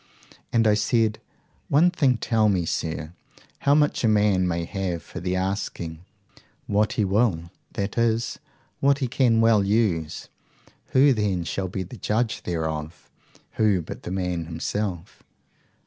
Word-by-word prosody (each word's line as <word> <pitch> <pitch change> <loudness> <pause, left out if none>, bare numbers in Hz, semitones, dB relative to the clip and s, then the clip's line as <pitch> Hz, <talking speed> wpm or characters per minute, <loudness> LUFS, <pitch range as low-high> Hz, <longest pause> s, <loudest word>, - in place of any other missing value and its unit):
And 115 -1 +3
I 105 - +5
said, 110 +1 +1 0.5
One 165 +6 +5
thing 140 -8 +2
tell 110 -2 +2
me, 90 -4 +1
sir 80 0 -3 0.5
how 140 0 +3
much 150 -3 +2
a - - +4
man 105 -4 +3
may 85 -1 -1
have 90 -4 -3
for - - -8
the 90 +1 -2
asking. 90 -3 -3 0.6
What 105 +1 +1
he 105 - +1
will 95 -5 +1 0.2
that 100 +3 -2
is, 115 0 0 0.4
what 140 0 +3
he 135 -3 -1
can 115 -2 +3
well 115 -3 +4
use. 95 -7 0 0.6
Who 135 +1 +5
then 100 -6 0
shall 95 +3 -3
be 95 +1 -4
the 95 +7 -10
judge 110 +3 -1
thereof? 80 -1 -4 0.5
Who 105 -5 +3
but - - -8
the - - -7
man 90 -2 -2
himself? 85 +2 -4
100 Hz, 150 wpm, -24 LUFS, 90-115 Hz, 0.6 s, I